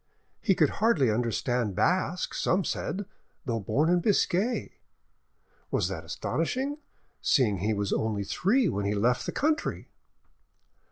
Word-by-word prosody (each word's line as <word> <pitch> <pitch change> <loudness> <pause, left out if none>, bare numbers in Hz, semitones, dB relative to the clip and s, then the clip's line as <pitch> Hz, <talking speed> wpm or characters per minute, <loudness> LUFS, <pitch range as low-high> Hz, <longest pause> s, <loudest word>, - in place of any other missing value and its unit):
He 195 - +3
could 155 -5 +3
hardly 155 - +4
understand 115 -1 -1
Basque, 180 - +1
some 185 +2 +1
said, 200 +3 -3 0.4
though 115 -2 -1
born 140 +10 +1
in 175 +1 +4
Biscay, 205 +4 0 0.9
was - - 0
that - - -5
astonishing, 280 +3 -2 0.4
seeing 110 -9 +2
he 105 +3 0
was 100 0 -1
only 110 -2 -1
three 210 - +2
when 100 - -1
he 105 +1 0
left 120 +4 +1
the - - -1
country? 310 +2 -1
145 Hz, 130 wpm, -28 LUFS, -, 0.9 s, hardly